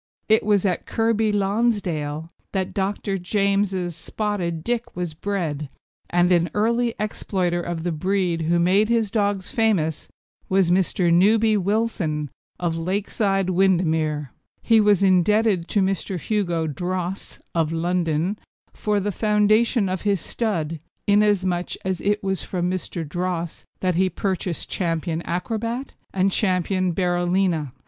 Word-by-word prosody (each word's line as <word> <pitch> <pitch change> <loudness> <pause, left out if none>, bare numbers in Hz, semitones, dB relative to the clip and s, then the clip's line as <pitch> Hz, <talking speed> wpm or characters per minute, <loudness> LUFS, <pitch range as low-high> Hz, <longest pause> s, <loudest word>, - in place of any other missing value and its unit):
It 220 0 +5
was 205 -2 +2
at 185 -2 -1
Kirkby 225 -1 +1
Lonsdale 195 -8 0 0.3
that 190 -2 -1
Dr. 195 0 -1
James's 195 -2 0
Spotted 175 -2 -3
Dick 240 +2 -2
was 175 -2 -3
bred, 155 -5 -3 0.4
and 175 +1 +3
an 175 -1 +3
early 235 +2 +1
exploiter 185 -4 -1
of 170 -2 -4
the 175 - -1
breed 180 0 0
who 165 +2 +2
made 190 +5 +3
his 225 -4 +1
dogs 200 -3 0
famous 200 - +1 0.4
was 190 -2 +3
Mr. 180 -1 +2
Newby 215 +5 +4
Wilson, 190 - -1 0.3
of 170 -2 -1
Lakeside, 195 +1 0
Windermere. 160 -6 +1 0.3
He 225 -2 +5
was 205 -2 +4
indebted 190 0 +3
to 205 - +2
Mr. 190 -1 -1
Hugo 175 -4 -1
Droesse, 180 +4 -3 0.2
of 165 -2 +1
London, 170 +2 0 0.3
for 210 -1 0
the 205 +1 -1
foundation 215 +2 +2
of 185 -1 -2
his 200 -2 +1
stud, 165 -6 -2 0.3
inasmuch 200 -4 +2
as 190 -2 -1
it 205 +1 0
was 190 -2 -1
from 175 -2 -2
Mr. 180 -3 -3
Droesse 175 +1 -3 0.2
that 185 -1 +1
he 185 +2 +2
purchased 185 -3 -3
Ch. - - -3
Acrobat 180 - -2 0.2
and 190 +1 +1
Ch. - - +1
Berolina. 180 - +1
185 Hz, 130 wpm, -23 LUFS, 170-205 Hz, 0.4 s, It